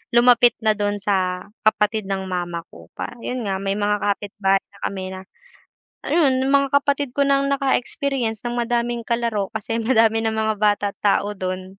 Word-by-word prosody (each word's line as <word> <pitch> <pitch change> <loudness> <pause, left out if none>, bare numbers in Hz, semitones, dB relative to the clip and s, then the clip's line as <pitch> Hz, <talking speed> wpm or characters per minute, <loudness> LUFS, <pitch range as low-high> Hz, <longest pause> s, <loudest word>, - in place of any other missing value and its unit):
lumapit 240 -1 +6
na 215 - +5
dun 205 0 -1
sa 185 -2 0 0.2
kapatid 215 0 +2
ng 190 -1 -2
mama 175 -2 -3
ko - - -16
pa - - -5 0.2
yun 250 -4 -3
nga 195 - 0
may 195 +1 -2
mga 205 0 0
kapitbahay 200 -1 +1
na 200 - -21
kami 190 -1 -3
na - - -7 0.8
ayun 270 -6 +2
yung 265 - 0
mga 280 0 +4
kapatid 285 -2 -1
ko 285 - +2
nang 275 0 +2
naka 275 -1 +2
experience 245 -4 -3
ng 240 0 -3
madaming 240 -1 -1
kalaro, 230 -4 0
kasi 225 +1 -2
madami 225 -1 +3
ng 220 - 0
mga 220 0 0
bata 205 -1 +2
at - - -23
tao 205 0 +1
dun, 185 -1 -5
220 Hz, 185 wpm, -22 LUFS, 200-245 Hz, 0.8 s, lumapit